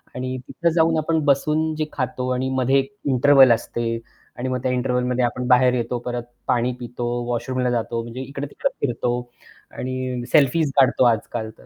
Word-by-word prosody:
आणि 130 0 -3
तिथे 170 -1 0
जाऊन 160 -1 +3
आपण 160 +1 +1
बसून 155 +3 +2
जे 155 0 -1
खातो 130 -1 -3
आणि 130 +1 -1
मध्ये 130 +1 +2 0.3
इंटरव्हल 135 -1 +6
असते 115 0 -1 0.4
आणि 130 +1 -3
मग 130 - -1
त्या 130 - +1
इंटरव्हलमध्ये 125 0 0
आपण 125 +1 -3
बाहेर 125 0 +5
येतो, 120 0 -1
परत 120 0 -4 0.2
पाणी 125 +1 +1
पितो, 120 0 -5 0.2
वॉशरूमला 125 +1 -1
जातो 115 0 -1
म्हणजे 120 +3 -7
इकडे-तिकडे 140 - -3 0.2
फिरतो 120 -1 -1 0.7
आणि 130 -1 -3
सेल्फी 150 +2 +4 0.2
काढतो 130 -1 +4
आजकाल 110 -1 0
तर - - -18
125 Hz, 160 wpm, -22 LUFS, 120-135 Hz, 0.7 s, इंटरव्हल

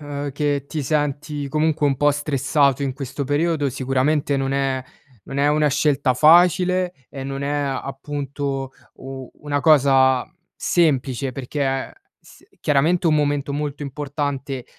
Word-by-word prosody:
ehm, 145 -1 -5
che 145 -1 -1
ti 150 -1 -4
senti 145 0 -2
comunque 155 0 +1
un 135 -2 +1
po' 145 +2 +3
stressato 140 -1 +1
in 135 -2 -1
questo 135 +1 -5
periodo, 145 +1 +1
sicuramente 140 +3 0
non 135 0 -1
è 135 -1 0 0.5
non 135 - -5
è 140 +1 +2
una 150 0 +3
scelta 140 -2 +1
facile 180 +4 +4 0.2
e 135 -2 -7
non 135 +1 -4
è 140 - -2
appunto, 140 -1 -3 0.2
u 130 -1 -9
una 145 -1 -1
cosa 135 -3 +4 0.3
semplice 135 -5 +1
perché, 135 +3 -4
è 135 0 -1 0.3
s - - -19 0.2
chiaramente 160 +4 +2
un 155 - +4
momento 145 -1 0
molto 145 0 -3
importante 140 -2 -4
140 Hz, 140 wpm, -21 LUFS, 135-150 Hz, 0.5 s, facile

